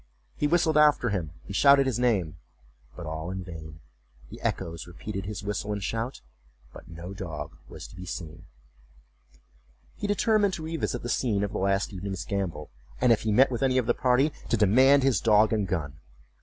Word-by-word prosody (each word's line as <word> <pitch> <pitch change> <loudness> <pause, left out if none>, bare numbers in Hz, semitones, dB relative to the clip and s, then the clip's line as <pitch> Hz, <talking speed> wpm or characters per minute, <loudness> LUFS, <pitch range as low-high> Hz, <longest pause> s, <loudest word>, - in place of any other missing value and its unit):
He 150 - 0
whistled 160 -1 +3
after 150 -5 +4
him 90 -7 -2 0.2
and 100 - -7
shouted 140 +2 +6
his 125 -3 -1
name, 100 -11 +1 0.6
but 85 - -8
all 80 +2 -5
in 95 0 -4
vain; 80 -3 -10 0.5
the - - -10
echoes 85 0 -3
repeated 95 +2 -6
his 105 0 -5
whistle 105 +1 -3
and 100 -1 -4
shout, 115 +5 -3 0.5
but - - -12
no 85 +2 -8
dog 80 -7 -6
was - - -9
to - - -15
be 90 0 -9
seen. 85 +1 -7 1.5
He 205 - -4
determined 205 -1 +2
to 160 - -7
revisit 160 -6 -3
the - - -3
scene 110 -4 0
of 100 - -2
the - - -3
last 100 +2 0
evening's 95 -2 -5
gambol, 90 -7 -3 0.3
and 125 -1 +4
if 115 - +3
he 110 - -1
met 130 +6 +5
with 120 - -3
any 130 -1 +2
of 125 - +2
the 120 - +2
party, 130 +5 +2 0.2
to 115 - +2
demand 130 +7 +5
his 135 -2 +2
dog 110 0 +4
and 105 -3 0
gun. 75 -5 -3
105 Hz, 190 wpm, -27 LUFS, 90-130 Hz, 1.5 s, shouted